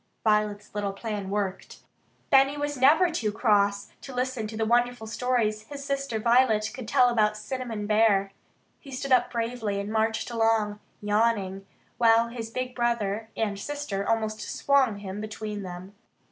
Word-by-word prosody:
Violet's 210 -1 +1
little 205 -1 -2
plan 205 -2 -5
worked. 200 -2 -3 0.5
Benny 275 +1 +5
was 290 0 -2
never 310 +7 +5
too 225 -10 -1
cross 205 -2 +1
to 270 - -9
listen 250 -3 -2
to 215 0 -7
the 220 - 0
wonderful 240 0 +1
stories 220 -2 -1
his 280 -1 -8
sister 275 -4 -2
Violet 225 -1 +3
could 255 -4 -8
tell 245 +2 +4
about 215 -3 +2
Cinnamon 225 -2 -4
Bear. 205 -2 +3 0.5
He 280 - -14
stood 270 +1 -5
up 245 -1 +4
bravely 230 -3 -2
and 200 +1 -4
marched 220 +2 0
along, 225 -2 +1 0.2
yawning, 205 -2 0 0.3
while 230 0 +5
his 230 -1 -6
big 255 +2 -4
brother 225 -3 -1
and 205 -3 -1
sister 285 -6 -3
almost 220 -1 0
swung 275 -6 +2
him 200 0 -6
between 215 -1 -5
them. 185 +1 -8
220 Hz, 155 wpm, -27 LUFS, 210-250 Hz, 0.5 s, Benny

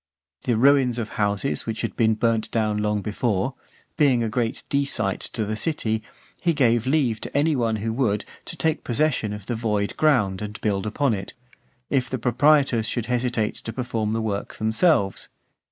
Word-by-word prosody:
The 120 -3 +2
ruins 130 -1 +4
of 110 -3 -3
houses 105 +6 -1
which 110 -1 -3
had 115 - -3
been 110 -1 +3
burnt 115 0 0
down 110 -2 0
long 105 -1 0
before, 110 +3 -1 0.4
being 130 -6 +4
a 115 - -1
great 115 0 -2
desight 140 -8 0
to 110 -3 -1
the 110 +1 -2
city, 110 -4 -1 0.4
he 170 - +1
gave 120 -4 +2
leave 130 -7 +1
to - - -3
any 150 +1 +3
one 115 -3 +1
who 110 +1 -2
would, 110 -5 0 0.2
to - - -6
take 160 -1 0
possession 125 -4 0
of 105 -1 -7
the 120 - -2
void 105 -3 -1
ground 110 -12 +2
and 105 0 -6
build 100 -1 0
upon 130 +3 +1
it, 95 -2 -5 0.6
if 130 -3 +1
the 130 - -2
proprietors 125 -1 +3
should 120 -3 -2
hesitate 120 -3 0
to 115 - -6
perform 115 -3 -2
the 115 0 -1
work 100 -2 -3
themselves. 110 - +1
115 Hz, 180 wpm, -24 LUFS, 105-130 Hz, 0.6 s, ruins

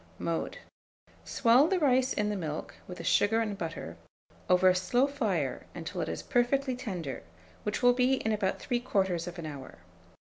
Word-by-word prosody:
Mode. - - -3 0.7
Swell 250 +5 +4
the 380 - +1
rice 260 -4 +3
in 210 0 0
the 210 - -1
milk, 155 -5 -4
with 180 - -8
the - - -7
sugar 220 +2 +3
and 215 -3 -1
butter, 165 - -6 0.5
over 180 +1 +5
a - - +5
slow 245 +8 +2
fire 210 - -2
until - - -5
it - - -2
is - - -4
perfectly 260 +1 +1
tender, 180 - -5 0.4
which 210 +4 -3
will 245 0 +7
be 250 +1 +2
in 220 -4 0
about 200 -3 0
3/4 190 -8 -1
hour. 140 -3 -9
210 Hz, 165 wpm, -30 LUFS, 180-250 Hz, 0.7 s, will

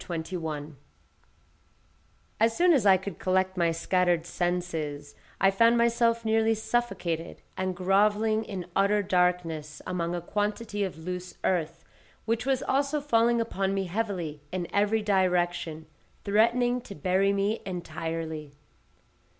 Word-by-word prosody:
CHAPTER 175 - -5
21 160 -3 -5 1.6
As 225 +1 +2
soon 350 0 +5
as 245 -9 +3
I 190 -1 +7
could 190 -1 -7
collect 185 0 +1
my 170 -2 +2
scattered 175 0 +1
senses, 165 -5 -3 0.3
I 195 +1 +5
found 230 +4 +4
myself 235 0 +2
nearly 225 0 +3
suffocated, 195 -8 -2
and 185 -1 -2
grovelling 210 +4 +2
in 190 -5 -6
utter 200 +1 +3
darkness 180 -5 0
among 175 -1 -2
a - - -2
quantity 205 +3 -2
of 190 -4 -4
loose 180 +2 -6
earth, 165 -2 -1 0.4
which 230 +3 -1
was 265 -2 +1
also 280 +2 +1
falling 235 -4 +2
upon 195 -4 -1
me 195 - 0
heavily 180 -6 -3
in 180 -2 -3
every 210 +2 +2
direction, 175 -5 0 0.4
threatening 240 +4 +2
to 205 - -10
bury 185 +5 +2
me 200 +2 0
entirely. 160 -4 -5
190 Hz, 130 wpm, -28 LUFS, 170-220 Hz, 1.6 s, I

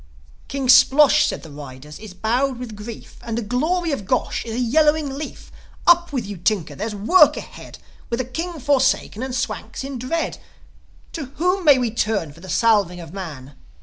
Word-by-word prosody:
"King 275 -1 -3
Splosh," 285 +3 +6
said - - -4
the 160 - -11
riders, 145 0 -10
"is 210 -4 -11
bowed 245 +6 0
with 240 -3 -7
grief; 215 +2 -10
And 230 -1 -4
the 235 - -2
glory 315 - 0
of 205 -9 -4
Gosh 255 - 0
is 225 -1 -5
a - - -2
yellowing 300 +4 +2
leaf. 295 +1 -8 0.3
Up 345 -1 +5
with 255 -6 -2
you, 200 -1 -7
Tinker! 180 -1 0
There's 210 +1 -4
work 220 - +5
ahead. - - -10 0.3
With 235 - -2
a 255 - -1
King 330 +6 -5
forsaken, 265 -4 +1
and 260 -1 -3
Swanks 265 - -4
in 270 -2 -6
dread, 320 +7 -2 0.7
To 315 -4 -4
whom 360 +3 0
may 290 -3 +7
we 245 -3 0
turn 205 -9 -1
for 165 - -17
the 185 +2 -11
salving 205 -6 +2
of 165 -1 -10
man?" 150 -8 -8
245 Hz, 185 wpm, -21 LUFS, 205-285 Hz, 0.7 s, may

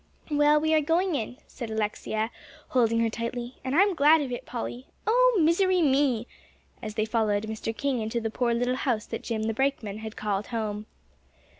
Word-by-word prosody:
"Well, 295 +1 +4
we 315 +1 +1
are 310 - +5
going 340 +5 +1
in," 245 -2 -3
said 235 -3 -7
Alexia, 220 +1 -2 0.4
holding 230 -2 +2
her 230 - +2
tightly, 240 +2 -4
"and 265 +2 -2
I'm 395 +3 +5
glad 310 0 +5
of 270 -3 -3
it, 245 - -5
Polly. 245 +1 -5 0.2
Oh, - - +4
misery 360 +3 +3
me!" 270 -5 +2 0.6
as 215 -1 -6
they 215 -1 +1
followed 220 -2 +1
Mr. 220 +1 -4
King 275 -3 0
into 220 +2 -2
the 225 -1 -3
poor 240 +1 0
little 245 +2 0
house 240 -6 -1
that - - -5
Jim 220 -2 -3
the 225 0 0
brakeman 230 -5 -1
had 220 0 -7
called 205 -1 -2
home. 215 -2 -3
240 Hz, 185 wpm, -27 LUFS, 220-290 Hz, 0.6 s, are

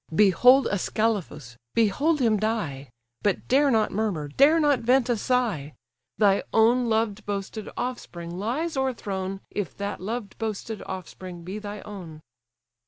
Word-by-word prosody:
Behold 245 +8 +6
Ascalaphus! 200 - -1 0.2
behold 275 +8 +2
him 225 -3 +3
die, 195 -11 -2 0.3
But 205 -2 0
dare 280 +2 +4
not 220 -4 +2
murmur, 190 -9 -2
dare 285 - +5
not 290 -4 +3
vent 250 +1 +2
a 240 - +3
sigh; 210 - -1 0.4
Thy 200 -2 +4
own 235 +2 +4
loved 220 -2 0
boasted 200 +1 -4
offspring 175 -9 -5
lies 290 - -2
o'erthrown, 195 -8 -2
If 205 -5 -4
that 200 -2 -4
loved 215 +1 -5
boasted 220 -1 -4
offspring 185 -1 -7
be 190 +5 -5
thy 205 -1 -7
own." 175 -7 -9
215 Hz, 135 wpm, -26 LUFS, 190-245 Hz, 0.4 s, Behold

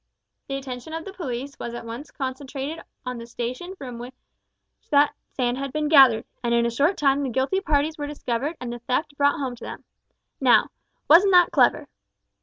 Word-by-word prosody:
The 275 - -3
attention 265 +2 -7
of 325 0 -5
the 390 - -8
police 275 -6 -5
was 235 0 -5
at 240 - -7
once 235 +6 -7
concentrated 275 +3 -5 0.2
on 250 -1 -4
the 230 - -9
station 250 +11 -5
from 250 -8 -8
which 250 +2 -9 0.7
that 290 -1 +4 0.2
sand 250 0 -1
had 275 -1 -4
been 300 +1 -1
gathered, 265 -7 +7 0.2
and 235 0 +1
in 235 0 +3
a 235 - 0
short 290 +11 +2
time 280 -1 +2
the 275 - -1
guilty 265 +10 0
parties 305 -2 0
were 290 - -3
discovered 290 +2 -3
and 245 -1 -5
the 240 - -7
theft 285 +5 -2
brought 285 +2 +2
home 265 -4 -3
to - - -13
them. - - -8 0.6
Now, - - +4 0.4
wasn't 370 +5 +7
that 355 -1 +6
clever?" - - +3
275 Hz, 195 wpm, -24 LUFS, 245-300 Hz, 0.7 s, gathered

